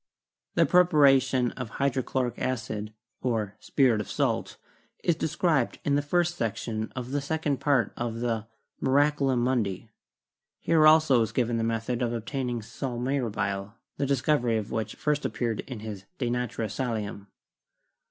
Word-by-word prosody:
The -, -, +5 dB
prepa 180 Hz, -1 st, +4 dB
ration 135 Hz, -4 st, +4 dB
of 125 Hz, -4 st, -6 dB
hydrochloric 130 Hz, -2 st, 0 dB
acid, 110 Hz, -4 st, -3 dB, 0.3 s
or 110 Hz, -5 st, -1 dB
'spirit 125 Hz, -6 st, +2 dB
of 105 Hz, -, -8 dB
salt,' -, -, -1 dB, 0.5 s
is 170 Hz, -, +3 dB
described 155 Hz, -4 st, 0 dB
in 145 Hz, -, +2 dB
the 145 Hz, -, +3 dB
first 175 Hz, +4 st, 0 dB
section 110 Hz, 0 st, -2 dB
of 125 Hz, 0 st, -5 dB
the 145 Hz, 0 st, 0 dB
second 145 Hz, -2 st, -1 dB
part 140 Hz, -3 st, +2 dB
of 120 Hz, -1 st, -3 dB
the 115 Hz, -2 st, -2 dB, 0.3 s
'Miraculum 135 Hz, -2 st, +2 dB
Mundi.' 110 Hz, -5 st, -1 dB, 0.7 s
Here 160 Hz, -2 st, +4 dB
also 155 Hz, -6 st, +6 dB
is 110 Hz, -, 0 dB
given 120 Hz, -2 st, 0 dB
the 115 Hz, -, 0 dB
method 115 Hz, +2 st, -1 dB
of 120 Hz, -1 st, 0 dB
obtaining 120 Hz, 0 st, -3 dB
'sal 125 Hz, +2 st, -5 dB
mirabile,' 105 Hz, -6 st, -2 dB, 0.2 s
the 140 Hz, -, 0 dB
discovery 125 Hz, -3 st, +2 dB
of 105 Hz, -1 st, -4 dB
which 110 Hz, -1 st, -3 dB
first 150 Hz, -1 st, 0 dB
appeared 115 Hz, -3 st, -2 dB
in 125 Hz, -5 st, -6 dB
his 105 Hz, -3 st, -7 dB
*De 120 Hz, -3 st, -1 dB
Natura 125 Hz, -2 st, -2 dB
Salium.' 105 Hz, -3 st, -3 dB
125 Hz, 150 wpm, -27 LUFS, 115-140 Hz, 0.7 s, also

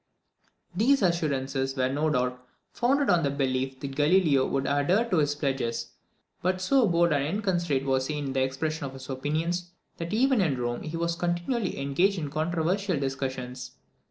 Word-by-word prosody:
These 240 Hz, +5 st, +3 dB
assurances 135 Hz, -6 st, 0 dB
were 130 Hz, 0 st, +2 dB
no 145 Hz, +4 st, 0 dB
doubt 125 Hz, -2 st, -1 dB, 0.3 s
founded 275 Hz, +1 st, +2 dB
on 175 Hz, -1 st, +4 dB
the 145 Hz, -, +1 dB
belief 135 Hz, -1 st, -1 dB
that 135 Hz, -1 st, -5 dB
Galileo 150 Hz, -3 st, +3 dB
would 135 Hz, 0 st, -1 dB
adhere 160 Hz, +12 st, +2 dB
to 180 Hz, -, +3 dB
his 145 Hz, -1 st, +1 dB
pledges; 135 Hz, -5 st, -2 dB, 0.5 s
but 185 Hz, +1 st, 0 dB
so 250 Hz, +5 st, +3 dB
bold 170 Hz, -2 st, +3 dB
and 140 Hz, -1 st, +1 dB
inconsiderate 175 Hz, -5 st, 0 dB
was 130 Hz, 0 st, +1 dB
he 150 Hz, -, -2 dB
in 140 Hz, -2 st, -3 dB
the 135 Hz, -, +1 dB
expression 140 Hz, +3 st, -2 dB
of 135 Hz, -, -9 dB
his 135 Hz, 0 st, -8 dB
opinions, 165 Hz, +6 st, -2 dB, 0.3 s
that 170 Hz, 0 st, -5 dB
even 255 Hz, +1 st, +3 dB
in 145 Hz, -8 st, 0 dB
Rome 120 Hz, 0 st, -2 dB
he 160 Hz, +1 st, -5 dB
was 170 Hz, 0 st, -1 dB
continually 175 Hz, -, -1 dB
engaged 175 Hz, +9 st, +1 dB
in 150 Hz, -4 st, -4 dB
controversial 170 Hz, +3 st, 0 dB
discussions. 130 Hz, -2 st, -4 dB
150 Hz, 170 wpm, -27 LUFS, 135-175 Hz, 0.5 s, on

